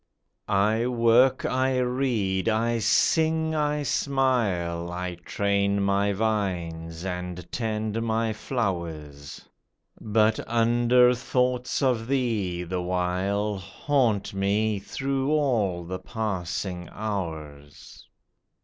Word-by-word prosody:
I 110 +4 +2
work, 125 +2 +4
1 130 0 +1
read, 115 -7 0
I 115 +1 +1
sing, 160 - +2
I 150 -1 0
smile, 105 -13 0
I 90 0 -4
train 100 +2 0
my 100 +1 +2
vines 90 -6 -2
and 90 -1 -5
tend 110 -1 -2
my 115 0 0
flowers; 85 - -4 0.5
But 110 0 +2
under 120 +2 +4
thoughts 125 +1 0
of 120 -4 +1
thee, 110 -10 -1
the 90 +1 -3
while, 95 +3 -1
Haunt 105 +2 0
me 100 +2 +1
through 135 +6 -2
all 110 - +1
the 90 +2 -5
passing 95 -4 -4
hours. 80 -9 -6
105 Hz, 95 wpm, -26 LUFS, 90-125 Hz, 0.5 s, work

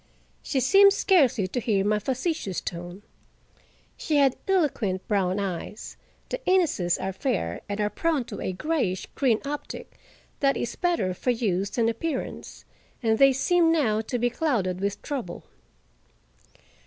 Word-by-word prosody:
She 275 - -1
seemed 395 +9 +6
scarcely 290 - +3
to 245 - -2
hear 205 -4 +1
my 210 0 +2
facetious 260 - -2
tone. 175 +3 -7 0.9
She 310 - -2
had 275 -3 +4
eloquent 260 - 0
brown 195 -2 +1
eyes—the 200 - -6
Inneses 315 - +2
are 190 0 -3
fair, 185 - -2
and 205 +1 -3
are 210 0 0
prone 325 -6 0
to - - -7
a - - -2
grayish 195 - -1
green 245 -6 +2
optic 290 +1 -6 0.4
that 275 -1 +2
is 240 - -3
better 335 - 0
for 215 - -3
use 200 -5 0
than 230 +1 0
appearance—and 230 -4 -4
they 275 0 +7
seemed 330 +5 +3
now 230 -10 +2
to 235 +3 -3
be 245 0 +1
clouded 225 - 0
with 200 +1 -2
trouble. 245 -12 -5
235 Hz, 140 wpm, -26 LUFS, 195-295 Hz, 0.9 s, they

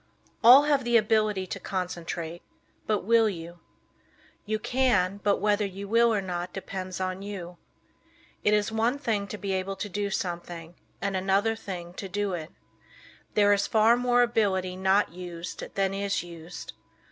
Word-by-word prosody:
All 250 +5 +10
have 290 -2 +2
the 240 -1 +4
ability 215 -3 +2
to - - -6
concentrate, 175 -2 -4 0.5
but 210 -2 +1
will 225 +1 +4
you? 170 -2 -8 0.9
You 215 +1 0
can, 215 -6 +1
but 200 0 +2
whether 210 +1 +1
you 200 0 -5
will 230 +2 +4
or 205 -3 0
not 180 -1 -4
depends 185 -1 -5
on 185 0 -2
you. 185 -4 -7 0.9
It 210 - +4
is 210 +1 0
one 230 +4 +1
thing 215 -7 -1
to 210 - -6
be 200 -1 -3
able 190 +1 -2
to 205 - -4
do 200 +2 -2
something, 175 -4 -4 0.3
and 195 -1 -1
another 195 +4 +2
thing 175 -5 -7
to 195 - -5
do 205 0 -1
it. 160 -2 -5 0.9
There 205 -1 +5
is 200 0 +1
far 220 +2 +5
more 245 0 +3
ability 195 -6 +1
not 190 0 +2
used 175 -2 -7
than 195 -1 +1
is 200 -2 -1
used. 170 0 -9
195 Hz, 160 wpm, -27 LUFS, 180-215 Hz, 0.9 s, All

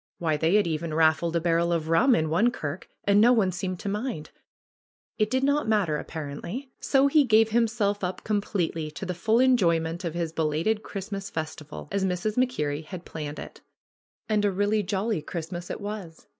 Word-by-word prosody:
Why, 160 -3 0
they 160 +5 +2
had 210 - +4
even 160 -1 -2
raffled 160 +1 +3
a - - +3
barrel 170 0 +1
of 165 -2 0
rum 235 +11 +4
in 155 -1 0
one 215 +9 +4
kirk, 160 -7 -6
and 200 +1 +4
no 240 +3 +7
one 205 -6 +2
seemed 185 0 -4
to 210 - -6
mind! 210 - -3 0.9
It 215 0 +2
did 260 +2 0
not 285 -1 +2
mat 215 -3 +3
ter 155 -2 -1
apparently. 165 - -6
So 270 0 +3
he 290 +1 +5
gave 225 -3 +4
himself 220 -3 +1
up 180 0 -3
completely 190 -7 -1
to 155 +5 -7
the 180 - -2
full 220 +6 +2
enjoyment 170 -10 +2
of 170 -2 -3
his 165 -2 -2
belated 165 +7 0
Christmas 195 -1 -6
festival 155 -2 -6
as 200 0 0
Mrs. 190 +3 -1
MacKerrie 155 - 0
had 180 +1 -8
planned 150 -2 -6
it. - - -9 0.7
And 215 -2 +1
a 205 - +3
really 205 +2 +1
jolly 200 -1 -1
Christmas 175 +2 -6
it - - -4
was! 205 -5 -7
185 Hz, 190 wpm, -26 LUFS, 165-215 Hz, 0.9 s, no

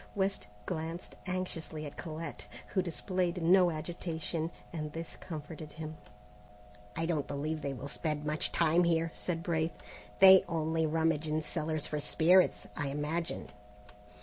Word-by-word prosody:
West 195 - 0 0.2
glanced 165 +2 -4
anxiously 165 -4 -3
at 145 - -8
Colette, 165 0 -6 0.2
who 190 - +1
displayed 180 0 -1
no 180 +1 +6
agitation, 165 0 -3 0.2
and 155 -2 -4
this 165 0 -6
comforted 155 -2 -8
him. 155 0 -6 1.0
"I 165 - 0
don't 160 -4 0
believe 155 +2 -2
they 140 - -2
will 135 +2 -6
spend 150 0 -2
much 150 +1 +1
time 170 +1 +4
here," 165 -1 +2
said 165 -2 -2
Braith; 165 -2 0 0.4
"they 190 -1 +9
only 160 -1 +1
rummage 160 -1 +1
in 155 +1 0
cellars 155 0 -1
for 150 - -1
spirits, 175 +5 +4
I 145 - -1
imagine." 150 +4 -2
160 Hz, 140 wpm, -32 LUFS, 155-170 Hz, 1.0 s, they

